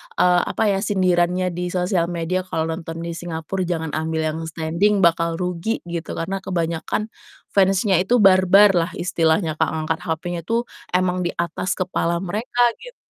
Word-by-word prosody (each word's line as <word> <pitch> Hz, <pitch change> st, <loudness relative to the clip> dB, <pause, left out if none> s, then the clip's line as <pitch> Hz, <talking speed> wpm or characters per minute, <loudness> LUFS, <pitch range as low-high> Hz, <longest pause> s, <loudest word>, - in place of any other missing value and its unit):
eee, 180 Hz, -1 st, +4 dB
apa -, -, -1 dB
ya 195 Hz, -, 0 dB
sindirannya 180 Hz, -2 st, +1 dB
di 180 Hz, +1 st, -3 dB
sosial 180 Hz, -1 st, 0 dB
media 175 Hz, +1 st, -2 dB
kalau 160 Hz, -, -1 dB
nonton 165 Hz, 0 st, -6 dB
di 170 Hz, -, -4 dB
Singapora 170 Hz, +2 st, -5 dB
jangan 160 Hz, -3 st, -2 dB
ambil 160 Hz, +1 st, -2 dB
yang 155 Hz, +1 st, -2 dB
standing 170 Hz, +6 st, +1 dB
bakal 165 Hz, 0 st, +3 dB
rugi, 180 Hz, +5 st, -3 dB
gitu, 170 Hz, -1 st, -5 dB
karena 195 Hz, +3 st, -3 dB
kebanyakan 175 Hz, +4 st, -2 dB, 0.4 s
fans-nya 195 Hz, -1 st, +3 dB
itu 210 Hz, +4 st, +2 dB
barbar 195 Hz, +2 st, +6 dB
lah 175 Hz, -1 st, +1 dB
istilahnya, 165 Hz, -2 st, 0 dB
Kak, -, -, +3 dB
ngangkat 160 Hz, +1 st, -2 dB
HP-nya 170 Hz, +1 st, -3 dB
tuh 230 Hz, +1 st, +1 dB, 0.3 s
emang 185 Hz, 0 st, +1 dB
di -, -, -2 dB
atas 170 Hz, +2 st, -2 dB
kepala 180 Hz, -2 st, -1 dB
mereka, 225 Hz, +6 st, 0 dB, 0.2 s
gitu. -, -, -12 dB
175 Hz, 160 wpm, -21 LUFS, 165-190 Hz, 0.4 s, barbar